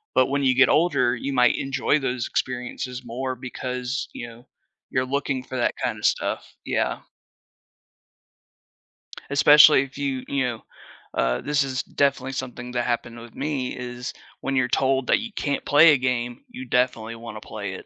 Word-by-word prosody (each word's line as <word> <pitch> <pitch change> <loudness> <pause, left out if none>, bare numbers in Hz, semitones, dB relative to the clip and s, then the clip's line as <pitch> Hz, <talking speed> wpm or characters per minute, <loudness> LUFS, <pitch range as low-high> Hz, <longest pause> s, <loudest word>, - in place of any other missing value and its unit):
but 130 - +5
when 140 +1 0
you 130 -1 +3
get 130 0 +6
older, 140 -7 +3
you 135 +3 -4
might 125 -2 +4
enjoy 135 +2 0
those 125 -3 -2
experiences 125 0 -3
more 130 +2 -3
because, 125 +1 -4
you 120 - -6
know, 115 +2 -14 0.4
you're 130 -2 0
looking 135 -1 -2
for 130 0 -6
that 120 - +1
kinda - - -2
stuff. - - -1
Yeah. - - -1 2.3
Especially 145 0 +7
if 135 0 -11
you, 135 -2 -2
you 140 -1 0
know 120 -3 -4 0.5
uh, - - +1
this 150 0 +1
is 130 -2 -2
definitely 135 -1 0
something 125 -2 -6
that 120 -1 0
happened 120 -1 -2
with 115 -1 -12
me 140 -3 -2
is 125 0 -6 0.3
when 135 0 -1
you're 130 -1 +2
told 130 0 +1
that - - +4
you 235 -1 -6
can't 145 -8 -2
play 155 +2 +7
a - - +3
game, 125 - -2
you 255 +2 -8
definitely 125 - 0
wanna 115 -2 -8
play 100 -3 -6
it. - - -10
130 Hz, 170 wpm, -24 LUFS, 125-140 Hz, 2.3 s, Especially